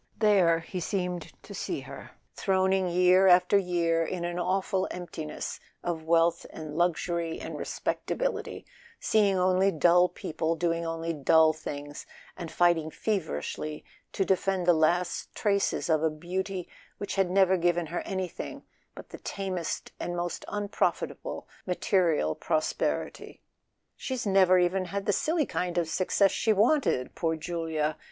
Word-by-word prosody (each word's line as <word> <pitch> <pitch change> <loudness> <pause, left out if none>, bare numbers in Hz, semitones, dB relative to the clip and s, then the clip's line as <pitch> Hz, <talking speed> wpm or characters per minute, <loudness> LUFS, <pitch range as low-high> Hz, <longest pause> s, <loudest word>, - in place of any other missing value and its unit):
There 185 -6 +4
he 180 +3 -6
seemed 180 -1 -3
to - - -10
see - - -3
her, - - -10 0.2
throning 190 -1 +1
year 180 +2 +5
after 180 +1 +5
year 170 -3 +2
in 175 +1 -3
an 175 0 -3
awful 190 +1 0
emptiness 165 -4 -6 0.2
of 165 -2 -3
wealth 170 +1 +3
and 155 -2 -8
luxury 170 -1 0
and - - -6
respectability, - - -3 0.3
seeing 205 -3 +2
only 185 +1 +3
dull 175 +2 +4
people, 160 +1 -2
doing 170 0 -1
only 165 0 -3
dull 160 +2 +4
things, 145 -1 -7 0.3
and 170 -3 -6
fighting 170 -3 +2
feverishly 155 - -3 0.3
to 195 - 0
defend 190 -1 +1
the 175 - +6
last 170 +2 0
traces 200 -2 0
of 160 -2 +2
a 160 - +2
beauty 180 +4 -4 0.3
which 200 - -4
had 195 -2 +1
never 190 0 +4
given 175 -1 +1
her 170 +3 -3
anything 190 -2 -5 0.3
but - - -11
the - - -9
tamest 185 -4 -4
and 175 0 -3
most 175 0 -3
unprofitable 205 0 -2 0.2
material 175 - +1
prosperity. 155 - -2 0.5
"She's 260 -3 -4
never 190 -2 +5
even 180 +1 +1
had 195 +2 -4
the 205 - +2
silly 315 - +1
kind 180 -5 -3
of 170 -2 +1
success 190 +3 +2
she 220 - +2
wanted—poor 200 - +1
Julia 160 -2 -2
175 Hz, 140 wpm, -28 LUFS, 165-190 Hz, 0.5 s, the